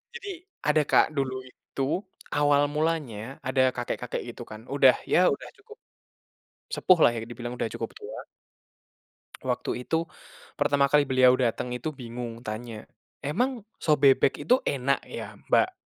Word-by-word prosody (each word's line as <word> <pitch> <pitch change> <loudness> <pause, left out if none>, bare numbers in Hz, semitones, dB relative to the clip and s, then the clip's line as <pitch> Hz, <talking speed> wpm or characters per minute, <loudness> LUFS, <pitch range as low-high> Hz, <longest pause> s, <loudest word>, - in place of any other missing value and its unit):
Jadi, 405 -4 -7 0.4
ada 150 0 +4
Kak, - - +6
dulu 130 -1 0
itu 135 +1 -6 0.5
awal 145 -1 +4
mulanya, 155 -8 0 0.3
ada 130 0 +2
kakek-kakek 120 0 -3
itu 120 - -9
kan, 110 - -8
udah, 135 -2 +6 0.2
ya - - +5
udah - - -7
cukup 450 -1 -15 1.0
sepuh 185 -2 +4
lah - - +7
ya 115 - -3
dibilang, 120 +1 -6
udah 115 - -1
cukup - - -4
tua. - - -8 1.3
Waktu 125 - -2
itu, 165 +1 0 0.5
pertama 140 -1 +3
kali 145 +1 +4
beliau 130 -1 +5
dateng 125 0 -1
itu 130 +6 -3
bingung, 120 -3 -7
tanya, 110 0 -6 0.3
"Emang 235 - -1 0.2
sop 150 -3 +3
bebek 135 0 +4
itu 250 - +7
enak 140 0 0
ya, - - -7 0.2
Mbak?" - - +4
135 Hz, 145 wpm, -27 LUFS, 120-150 Hz, 1.3 s, lah